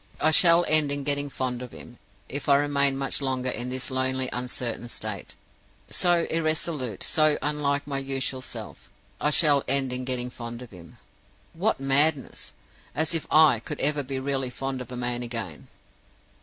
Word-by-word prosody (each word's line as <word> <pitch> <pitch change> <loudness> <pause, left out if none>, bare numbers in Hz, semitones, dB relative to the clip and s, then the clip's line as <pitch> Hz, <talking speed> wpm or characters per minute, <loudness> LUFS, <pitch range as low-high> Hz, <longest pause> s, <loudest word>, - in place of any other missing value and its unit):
"I 155 - +4
shall 170 +1 +6
end 155 -2 +3
in 145 0 -2
getting 145 0 -2
fond 125 -2 -3
of 125 - -8
him. 120 - -12 0.3
If 145 +1 -4
I 140 - +7
remain 140 -1 +2
much 135 +1 +1
longer 130 -2 -1
in 120 +1 -4
this 130 +1 -3
lonely 130 0 -1
uncertain 125 -1 -3
state 105 -4 -6 0.6
so 175 -2 +3
irresolute, 155 - -1
so 155 -1 +4
unlike 145 -1 0
my 140 -1 -2
usual 135 -1 -3
self 130 - -9 0.3
I 150 - +2
shall 150 -2 +5
end 135 -1 +1
in 125 0 -3
getting 125 -1 -3
fond 120 0 -7
of 125 - -13
him. 85 -3 -14 0.6
What 190 +3 0
madness! 135 +1 0 0.4
As 160 +2 +1
if 165 - -1
I 155 -6 +6
could 115 - -6
ever 150 +1 +2
be 135 0 -4
really 135 -1 -1
fond 130 +1 -4
of 125 - -9
a 125 - -5
man 120 0 -2
again! 115 -10 -6
135 Hz, 170 wpm, -26 LUFS, 125-145 Hz, 0.6 s, I